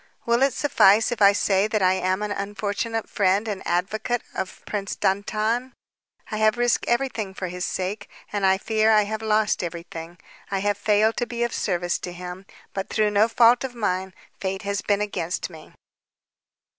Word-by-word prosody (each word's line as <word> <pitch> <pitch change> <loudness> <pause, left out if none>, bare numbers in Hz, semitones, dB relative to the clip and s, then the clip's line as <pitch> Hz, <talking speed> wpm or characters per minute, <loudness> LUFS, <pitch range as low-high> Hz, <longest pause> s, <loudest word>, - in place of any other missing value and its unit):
"Will 235 +1 +2
it 270 -1 +3
suffice 225 -6 +4
if 240 - -3
I 200 0 +8
say 200 0 +2
that 215 -2 0
I 185 0 +5
am 185 +2 0
an 210 - -3
unfortunate 205 +3 -3
friend 200 +2 +1
and 205 -3 -3
advocate 215 +7 -1
of 190 - -5
Prince 200 -2 -3
Dantan? 215 +6 0 0.6
I 215 - -2
have 215 +1 +3
risked 240 0 +1
everything 240 -6 -1
for 185 -2 -4
his 180 +1 -4
sake 200 +3 -3 0.2
and 205 -1 -1
I 190 0 +4
fear 220 +2 +1
I 215 -1 +5
have 215 +1 -4
lost 215 -2 +1
everything. 170 0 -7 0.3
I 195 - -1
have 205 +1 0
failed 215 +2 +2
to 245 - -1
be 235 0 -2
of 235 - -1
service 175 0 -1
to 180 - -6
him, 180 +2 -8 0.3
but 195 0 -4
through 215 -1 +1
no 205 +2 +4
fault 235 +1 +5
of 255 -2 -5
mine. 190 -4 -2 0.2
Fate 190 0 -3
has 200 0 -2
been 205 0 +1
against 180 -4 -3
me." 160 -2 -13
205 Hz, 180 wpm, -24 LUFS, 190-220 Hz, 0.6 s, I